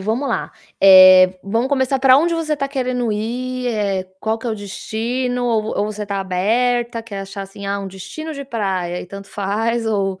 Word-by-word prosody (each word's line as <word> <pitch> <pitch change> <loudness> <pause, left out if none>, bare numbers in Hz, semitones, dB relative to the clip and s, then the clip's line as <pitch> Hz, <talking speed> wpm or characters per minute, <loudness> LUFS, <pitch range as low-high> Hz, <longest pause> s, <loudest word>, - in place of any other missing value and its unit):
vamo 225 +8 -1
lá. - - -2 0.3
Eh, 185 -1 +8
vamo 225 +5 0
começar 270 -1 +1
pra 260 0 +6
onde 335 +3 +1
você 315 -2 -1
tá 275 -1 -2
querendo 250 -4 -1
ir, 250 +4 -3
eh, 200 -5 -1 0.2
qual 220 +1 -1
que 240 - -7
é - - -1
o - - -1
destino 240 +5 -3
ou 225 -2 +1
v 215 - -3
ou 205 - 0
você 210 0 -5
tá 200 -1 -2
aberta, 230 +5 0
quer 205 -3 -7
achar, 195 0 -7
assim: 195 +1 -9
"Ah, 200 0 -2
um 195 - -6
destino 310 - -8
de 280 0 -6
praia" 190 -7 -2
e - - -9
tanto 200 +2 -10
faz 225 +4 -1
ou 195 -3 -1
220 Hz, 205 wpm, -19 LUFS, 195-250 Hz, 0.3 s, Eh